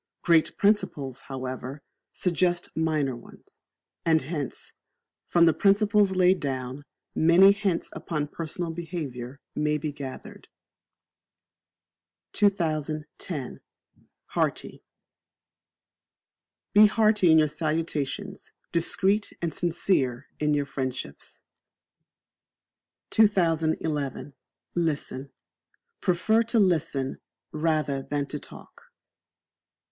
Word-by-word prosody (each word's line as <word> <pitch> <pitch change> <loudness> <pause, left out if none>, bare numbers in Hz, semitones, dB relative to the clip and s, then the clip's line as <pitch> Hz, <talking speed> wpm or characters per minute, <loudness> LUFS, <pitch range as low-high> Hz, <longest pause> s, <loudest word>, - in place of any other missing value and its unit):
Great 165 -2 +3
principles, 145 - +1
however, 130 +1 -5 0.3
suggest 175 -1 0
minor 155 -5 0
ones; 120 - -16 0.4
and 160 -2 +3
hence, 145 -2 -5 0.5
from 170 -1 +5
the 165 - +5
principles 200 +2 +3
laid 185 0 +4
down, 130 0 -4 0.3
many 175 +5 +6
hints 200 -4 -1
upon 150 -3 -3
personal 165 +2 -4
behaviour 145 -7 -6
may 150 0 0
be 150 0 -3
gathered. 140 -2 -9 1.9
2010. 155 -5 -1 0.7
Hearty. - - -2 1.9
Be 210 +1 +8
Hearty 210 -4 +4
in 160 - +7
your 155 -1 +5
salutations, 155 -1 -3 0.2
discreet 195 +5 +1
and 170 -3 -2
sincere 160 -8 0
in 150 -1 +2
your 145 -1 0
friendships. 130 - -6 1.7
2011. 160 -8 +1 0.4
Listen. 145 -5 -2 0.7
Prefer 200 +5 +2
to 230 +1 0
Listen 155 -8 +1 0.3
rather 155 -3 0
than 145 +1 -2
to 150 - -6
talk. - - -13
160 Hz, 85 wpm, -26 LUFS, 140-180 Hz, 1.9 s, Be